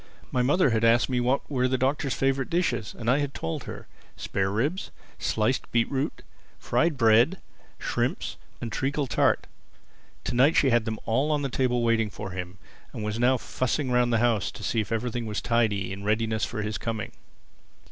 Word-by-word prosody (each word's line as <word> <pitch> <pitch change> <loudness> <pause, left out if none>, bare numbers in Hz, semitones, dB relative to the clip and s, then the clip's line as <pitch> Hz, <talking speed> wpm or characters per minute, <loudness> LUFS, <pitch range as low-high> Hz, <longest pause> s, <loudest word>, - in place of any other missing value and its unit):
My 125 - +1
mother 140 +3 +3
had 110 0 +1
asked 115 +2 +4
me 125 -1 +1
what 125 +3 +1
were 130 -3 +1
the 130 0 +1
Doctor's 135 +1 0
favorite 135 0 0
dishes, 170 - -1
and 115 - -6
I 130 +4 +4
had 140 -1 -2
told 80 0 -4
her: - - -8 0.3
spare 95 -1 -1
ribs, 140 - -1 0.3
sliced 110 +4 0
beet 115 -1 +1
root, 135 +2 -2 0.3
fried 165 -3 +1
bread, 115 - +5 0.4
shrimps - - -2 0.2
and 115 - -5
treacle 140 +4 -1
tart. 125 - +2 0.8
To - - -3
night 135 +6 +4
she 135 - +4
had 120 -1 +3
them 110 -1 -2
all 130 +7 +1
on 145 -1 +1
the 135 - -1
table 125 -2 +1
waiting 115 -2 +2
for 100 -1 -7
him; 90 +1 -6 0.4
and - - -5
she - - -3
was 105 +2 -2
now 125 +2 +4
fussing 130 +3 -2
round 125 0 +3
the 115 - +3
house 115 -3 +2
to - - -9
see 115 - 0
if 110 - -7
everything 115 +1 -2
was 105 - -2
tidy 105 -5 +1
and 100 - -7
in - - -9
readiness 110 +1 +1
for 105 - -4
his 105 0 -3
coming. 110 -2 -3
120 Hz, 200 wpm, -26 LUFS, 110-135 Hz, 0.8 s, bread